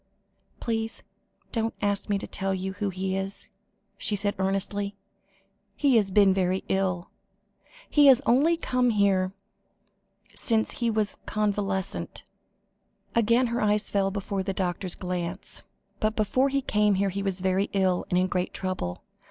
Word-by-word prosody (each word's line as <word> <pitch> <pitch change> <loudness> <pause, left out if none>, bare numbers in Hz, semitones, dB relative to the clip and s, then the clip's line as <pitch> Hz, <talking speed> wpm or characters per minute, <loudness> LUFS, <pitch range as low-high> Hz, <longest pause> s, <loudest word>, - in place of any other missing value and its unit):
"Please 225 -1 -2 0.5
don't 225 -1 -1
ask 205 0 0
me 200 - +2
to - - -5
tell 195 0 -2
you 190 +1 -3
who 205 0 -2
he 190 0 -2
is," 195 +1 -4 0.5
she 210 - +1
said 205 0 0
earnestly; 200 +1 -1 0.8
"he 280 -4 +3
has 205 -3 +2
been 195 0 +5
very 185 0 0
ill; 185 -2 0 0.8
he 295 -1 +5
has 265 -3 +8
only 295 +8 +4
come 250 -5 +1
here 195 -4 +2 1.0
since 220 -2 +1
he 235 -1 -1
was 215 -2 -1
convalescent," 200 -3 -2 0.9
again 230 +2 +3
her 240 - 0
eyes 210 0 +1
fell 195 -1 +2
before 200 0 -3
the 195 0 -2
doctor's 180 0 -2
glance, 180 -2 -4 0.4
"but 215 +1 0
before 255 +6 +2
he 275 0 0
came 210 -3 +2
here 195 +1 +1
he 200 +2 -3
was 195 -1 -1
very 190 +2 +1
ill, 190 -2 +2
and 180 - +2
in 185 - +3
great 180 -1 -2
trouble. 185 - -3
200 Hz, 150 wpm, -27 LUFS, 190-215 Hz, 1.0 s, has